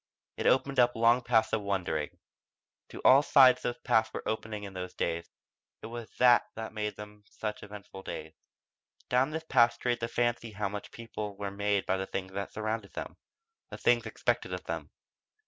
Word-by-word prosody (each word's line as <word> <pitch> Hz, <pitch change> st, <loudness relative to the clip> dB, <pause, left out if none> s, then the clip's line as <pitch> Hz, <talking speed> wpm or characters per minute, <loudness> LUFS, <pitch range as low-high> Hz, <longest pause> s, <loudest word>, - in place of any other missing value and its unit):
It -, -, 0 dB
opened 135 Hz, 0 st, +3 dB
up 120 Hz, 0 st, +4 dB
long 115 Hz, +2 st, +4 dB
paths 115 Hz, -2 st, +2 dB
of 110 Hz, -, +2 dB
wondering. 95 Hz, -7 st, -2 dB, 0.7 s
To -, -, -9 dB
all 135 Hz, +2 st, +8 dB
sides 130 Hz, -3 st, +6 dB
those 120 Hz, -, -2 dB
paths 110 Hz, -3 st, +2 dB
were -, -, -6 dB
opening 110 Hz, -1 st, -3 dB
in 100 Hz, -1 st, -7 dB
those 90 Hz, -1 st, -6 dB
days 85 Hz, 0 st, -2 dB, 0.5 s
it -, -, -5 dB
was 115 Hz, 0 st, -7 dB
that 125 Hz, -1 st, +6 dB
that 110 Hz, 0 st, -6 dB
made 105 Hz, -1 st, -3 dB
them 105 Hz, 0 st, -11 dB
such 105 Hz, -1 st, -5 dB
eventful 100 Hz, -2 st, -10 dB
days. 80 Hz, -4 st, -7 dB, 0.8 s
Down 130 Hz, +3 st, +3 dB
this 160 Hz, +1 st, -4 dB
path 120 Hz, -2 st, +5 dB
strayed 120 Hz, -1 st, -1 dB
the 115 Hz, -, -2 dB
fancy 120 Hz, -1 st, -1 dB
how 100 Hz, -1 st, -2 dB
much 105 Hz, +1 st, -6 dB
people 105 Hz, -3 st, -7 dB
were 100 Hz, -1 st, -4 dB
made 100 Hz, 0 st, 0 dB
by 95 Hz, -, +1 dB
the 95 Hz, 0 st, -3 dB
things 95 Hz, 0 st, -4 dB
which 100 Hz, 0 st, -4 dB
surrounded 110 Hz, -1 st, -4 dB
them -, -, -6 dB, 0.5 s
the -, -, -7 dB
things -, -, +2 dB
expected -, -, -1 dB
of -, -, -8 dB
them. -, -, -5 dB
110 Hz, 185 wpm, -30 LUFS, 100-120 Hz, 0.8 s, all